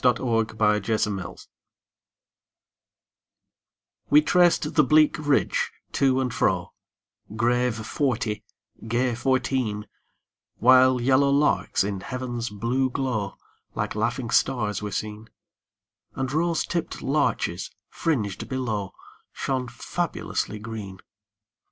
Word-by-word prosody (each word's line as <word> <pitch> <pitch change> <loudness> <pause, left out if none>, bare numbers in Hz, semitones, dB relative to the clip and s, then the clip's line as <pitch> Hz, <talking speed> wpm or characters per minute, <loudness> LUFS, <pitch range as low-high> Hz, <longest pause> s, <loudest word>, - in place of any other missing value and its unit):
22 125 0 +3 0.3
The 105 -1 +3 0.2
Train 105 -2 0
of - - -4
Life - - -14 2.6
We 150 - +7
traced 170 -2 +3
the 150 - +5
bleak 155 +2 +4
ridge, 145 -2 +1 0.2
to 130 -1 +2
and 125 -2 -1
fro, - - 0 0.6
Grave 120 +1 +1
forty, 120 -6 -1 0.4
gay 120 +2 +1
fourteen; 125 -3 0 0.7
While 130 +1 +6
yellow 135 +3 +3
larks, 140 -7 +2
in 100 -1 -3
heaven's 120 0 -4
blue 120 +6 0
glow, 120 -7 -2 0.4
Like - - -2
laughing 115 +3 -2
stars 110 -6 +1
were 105 - -3
seen, 105 +2 -5 0.9
And 135 +1 -2
rose 165 +1 +1
tipp'd 170 -1 -3
larches, 145 +1 0 0.2
fringed 110 - -2
below, 110 -7 -2 0.4
Shone 130 -2 -2
fabulously 110 - -3
green. 105 -3 -7
125 Hz, 105 wpm, -25 LUFS, 110-135 Hz, 2.6 s, We